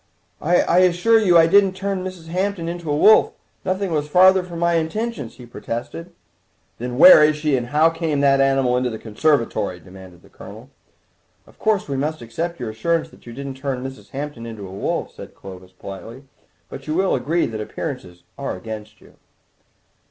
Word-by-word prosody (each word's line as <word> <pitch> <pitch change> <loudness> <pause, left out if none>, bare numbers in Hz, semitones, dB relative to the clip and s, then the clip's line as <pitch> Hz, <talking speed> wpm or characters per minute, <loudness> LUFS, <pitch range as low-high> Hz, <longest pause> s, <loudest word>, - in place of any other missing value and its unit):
"I 175 +1 +3
assure 185 +5 +4
you 180 -5 +4
I 165 - +7
didn't 195 +3 +4
turn 195 0 -3
Mrs. 185 -3 -8
Hampton 185 -1 -2
into 170 -2 -5
a 145 - +1
wolf; 215 +7 +5 0.3
nothing 190 0 -2
was 150 -2 -1
farther 185 +4 +5
from 175 -2 -9
my 170 0 +1
intentions," 165 - -3
he 125 - -12
protested. 120 +8 -6 0.7
"Then 125 +1 -5
where 160 0 +9
is 150 0 +3
she, 150 -2 0
and 120 -2 -2
how 155 +5 +3
came 165 -3 -2
that 135 -1 +4
animal 135 -2 +2
into 125 0 0
the 110 - -6
conservatory?" 115 - -1
demanded 90 +1 -14
the - - -19
Colonel. - - -13 0.7
"Of - - -22
course 215 -3 0
we 140 -2 -3
must 150 0 -3
accept 165 +9 -5
your 120 -3 -4
assurance 165 +9 -1
that - - -19
you - - -8
didn't 135 +1 -7
turn 135 -2 -4
Mrs. 130 -7 -9
Hampton 135 -2 -6
into 110 -4 -8
a - - -11
wolf," 100 - -3
said - - -12
Clovis 95 -1 -12
politely, 100 +7 -10 0.4
"but 135 +1 -10
you 155 - -2
will 190 +2 +1
agree 155 +7 0
that 110 -1 -5
appearances 105 - -7 0.2
are - - -4
against 110 -1 -9
you." - - -20
145 Hz, 185 wpm, -21 LUFS, 120-175 Hz, 0.7 s, where